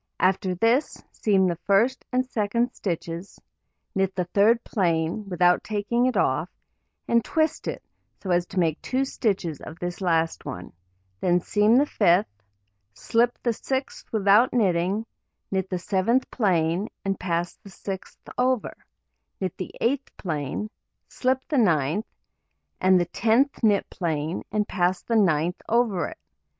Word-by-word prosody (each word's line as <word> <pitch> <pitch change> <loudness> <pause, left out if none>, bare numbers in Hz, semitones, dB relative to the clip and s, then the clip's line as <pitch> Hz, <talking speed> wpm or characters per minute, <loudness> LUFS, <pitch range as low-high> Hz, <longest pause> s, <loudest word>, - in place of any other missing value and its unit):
After 185 0 +1
this, 230 - +1
seam 195 -3 +2
the 175 -2 0
first 225 +7 +3
and 255 0 +1
second 235 +1 -1
stitches, 170 0 -5 0.5
knit 195 -1 0
the 180 - 0
third 215 +6 +3
plain, 175 +1 -1
without 180 -1 +3
taking 220 +4 0
it 255 - 0
off, - - +1 0.6
and 235 -1 +3
twist 315 -1 0
it - - -4 0.4
so 190 - -4
as 175 0 +2
to 195 - -9
make 165 -4 +1
2 260 +1 0
stitches 195 - -2
of 160 - -9
this 175 +1 -5
last 165 -3 +1
one; 90 0 -7 0.5
then 175 0 +3
seam 210 +5 +3
the 285 - +5
fifth, 180 -7 +3 0.7
slip 235 - +1
the 235 - +1
sixth 265 +4 -4
without 210 +2 +4
knitting, 195 -1 +1 0.5
knit 190 -1 -1
the 185 - -1
seventh 195 +8 0
plain, 180 -3 +1 0.2
and 195 -1 -1
pass 175 -1 -2
the 200 - -14
sixth 190 0 -8
over, 255 -3 +1 0.6
knit 185 -3 -3
the 185 - -5
eighth 270 +3 -1
plain, 160 +4 -3 0.4
slip 260 0 -1
the 295 -5 +1
ninth, 165 - +2 0.7
and 185 0 +5
the 175 - +1
tenth 235 - +1
knit 210 -4 +3
plain, 160 -1 -2
and 210 0 0
pass 180 -1 0
the 230 - -1
ninth 175 -4 +2
over 220 -8 +2
it. - - -9
195 Hz, 145 wpm, -25 LUFS, 175-230 Hz, 0.7 s, the